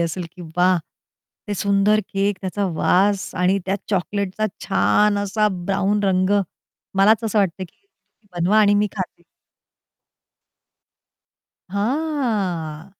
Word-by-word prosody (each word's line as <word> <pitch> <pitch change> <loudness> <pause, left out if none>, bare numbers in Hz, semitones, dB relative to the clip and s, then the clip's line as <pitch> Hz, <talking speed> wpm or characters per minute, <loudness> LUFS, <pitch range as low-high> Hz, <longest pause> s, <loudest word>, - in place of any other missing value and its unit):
असेल 170 +1 -2
की 180 - -11
वाह! 180 0 +4 0.7
ते 205 - -1
सुंदर 200 +2 +2
केक, 195 0 0
त्याचा 195 +1 -2
वास 195 +2 +2
आणि 190 +2 +3
त्या 195 +1 0
चॉकलेटचा 200 +2 -1 0.2
छान 210 -1 +2
असा 205 +1 +1 0.2
ब्राउन 200 +1 0
रंग 185 0 +2 0.7
मलाच 215 +3 +4
असं 215 -1 0
वाटतंय 190 -1 0
की 175 - -18
तुम्ही 200 - -14
बनवा 195 +6 +3
आणि 205 -1 +4
मी 205 +1 +2
खाते. 185 -2 -5 2.5
हां. 200 - -2
200 Hz, 115 wpm, -21 LUFS, 185-210 Hz, 2.5 s, वाह